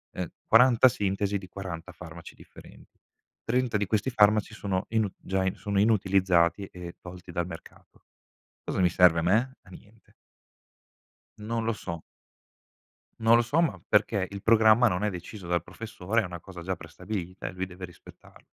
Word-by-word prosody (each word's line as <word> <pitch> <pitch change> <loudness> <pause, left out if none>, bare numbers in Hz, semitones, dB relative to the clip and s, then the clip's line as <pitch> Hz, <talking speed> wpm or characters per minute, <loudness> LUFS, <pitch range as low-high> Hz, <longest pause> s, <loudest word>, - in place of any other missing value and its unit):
ehm, 90 - -3 0.2
40 125 +2 +6
sintesi 100 -2 -1
di 95 - -10
40 90 -2 -7
farmaci 85 -2 -11
differen - - -15 0.6
30 125 -2 0
di 100 - -1
questi 110 +5 0
farmaci 105 -2 +3
sono 95 -2 -2
inu 110 -2 +1
già 95 0 -2
sono 100 -1 -2
inutilizzati, 95 -4 +3
e 90 -1 -9
tolti 90 0 -10
dal 85 0 -2
mercato. 85 -2 -13 0.6
Cosa - - -2
mi 90 - +5
serve 85 -1 +5
a - - -3
me? 110 +9 +2
A - - -19
niente. 105 +4 -17 1.3
Non 115 +2 -3
lo 115 - +1
so. 85 -6 -6 1.2
Non 115 +1 +5
lo 120 - +5
so, 120 +8 0
ma, 165 - -1
perché, 105 -2 +2
il 100 -1 -8
programma, 110 +1 +5
non 90 -1 -1
è 105 - +2
deciso 90 +1 -8
dal 85 -1 0
professore, 110 +1 -2
è - - -4
una 90 -1 -7
cosa 90 0 -11
già 95 +2 -3
prestabilita, 90 0 -6
e - - -4
lui 95 0 -4
deve 90 0 -9
rispettarlo. 90 - -17
100 Hz, 165 wpm, -27 LUFS, 90-110 Hz, 1.3 s, 40